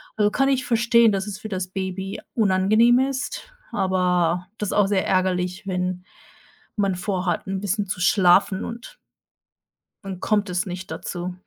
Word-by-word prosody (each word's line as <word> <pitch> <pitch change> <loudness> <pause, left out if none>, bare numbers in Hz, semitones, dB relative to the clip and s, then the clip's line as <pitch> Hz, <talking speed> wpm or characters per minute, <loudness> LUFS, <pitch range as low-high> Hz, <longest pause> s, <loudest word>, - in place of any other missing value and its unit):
Also, 210 -1 +3
kann 270 - +2
ich 260 -2 +1
verstehen, 235 -1 +4
dass 195 0 -2
es 205 0 -6
für 215 - -7
das 185 -2 -3
Baby 190 0 -4
unangenehm 215 +4 +4
ist, 275 - -3 0.2
aber 180 -2 +1
das 210 - -3
ist - - -2
auch 205 -2 +3
sehr 195 -2 +1
ärgerlich, 180 -1 0
wenn 180 -1 -2 0.7
man 195 -2 +1
vor 180 +1 -2
hat, 175 - -1
'n 190 0 -3
bisschen 205 0 -1
zu 185 - -4
schlafen 190 +1 +4
und 235 - -8 1.1
dann 190 -2 -6
kommt 205 -1 0
es 180 +3 -1
nicht 185 +1 -7
dazu. 180 0 -5
190 Hz, 160 wpm, -23 LUFS, 180-215 Hz, 1.1 s, verstehen